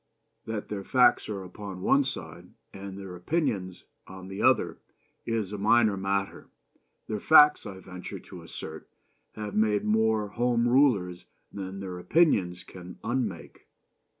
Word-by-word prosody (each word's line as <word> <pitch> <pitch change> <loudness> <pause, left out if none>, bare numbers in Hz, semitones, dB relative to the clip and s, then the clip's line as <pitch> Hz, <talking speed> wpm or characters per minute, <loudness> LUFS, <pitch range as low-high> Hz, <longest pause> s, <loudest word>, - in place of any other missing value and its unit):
That 110 -2 -5
their 100 -2 -4
facts 125 +2 +3
are 100 -2 -4
upon 95 0 -8
one 140 - +4
side 85 - -6 0.3
and 100 0 -8
their 95 -2 -8
opinions 95 - -2 0.2
on 95 0 -10
the 95 - -5
other - - +2 0.5
is 110 -4 -2
a 105 - -5
minor 110 0 +4
matter. 100 0 -2 0.6
Their 105 -1 -3
facts, 150 +4 +6
I 95 - -8
venture 90 -1 -8
to - - -12
assert, - - -9 0.4
have 105 -1 -6
made 105 -1 +2
more 110 -1 +2
Home 120 +1 +1
Rulers 115 -10 +2 0.3
than 95 0 -6
their 90 -2 -6
opinions 90 - +2
can 90 -1 -11
unmake. 115 -8 -4
100 Hz, 140 wpm, -27 LUFS, 95-115 Hz, 0.6 s, facts